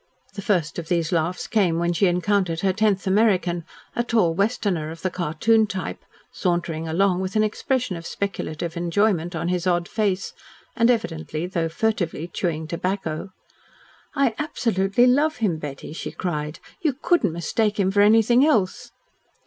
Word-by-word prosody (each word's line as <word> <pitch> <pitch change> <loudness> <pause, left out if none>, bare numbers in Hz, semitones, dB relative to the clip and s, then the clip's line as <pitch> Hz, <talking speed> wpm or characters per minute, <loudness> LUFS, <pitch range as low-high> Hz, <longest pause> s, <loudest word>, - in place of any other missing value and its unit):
The 200 - -6
first 175 -5 0
of 165 - -7
these 170 -3 0
laughs 170 +1 0
came 190 -7 +2
when 170 +1 +1
she 180 +1 +3
counted 185 -4 +1
her 190 -1 +2
tenth 205 -1 +1
American, 185 -4 +2 0.3
a 235 - +1
tall 220 -8 +2
Westerner 195 -5 0
of 165 +1 -9
the 185 - 0
cartoon 185 +7 +2
type, 190 -2 -5 0.3
sauntering 170 -3 -1
along 180 +3 +2
with 190 +2 -4
an 215 - +4
expression 245 0 -1
of 165 0 -7
speculative 170 -4 -4
enjoyment 175 0 +1
on 165 +2 -2
his 180 0 -1
odd 175 -1 +1
face, 200 -4 -1 0.4
and 230 -1 +3
evidently, 165 -9 -1
though 170 -3 -1
furtively, 175 -3 -1
chewing 165 -3 -2
tobacco. 170 +1 -3 0.9
"I 275 -5 +2
absolutely 230 -7 +1
love 290 +5 +3
him, 190 -9 0
Betty," 145 0 -7
she - - -5
cried. 150 -4 -4 0.2
"You 310 -6 +1
couldn't 280 - +1
mistake 205 +6 -1
him 190 -1 +2
for 205 +1 +3
anything 225 +4 +5
else." 240 -4 +1
185 Hz, 155 wpm, -23 LUFS, 170-215 Hz, 0.9 s, anything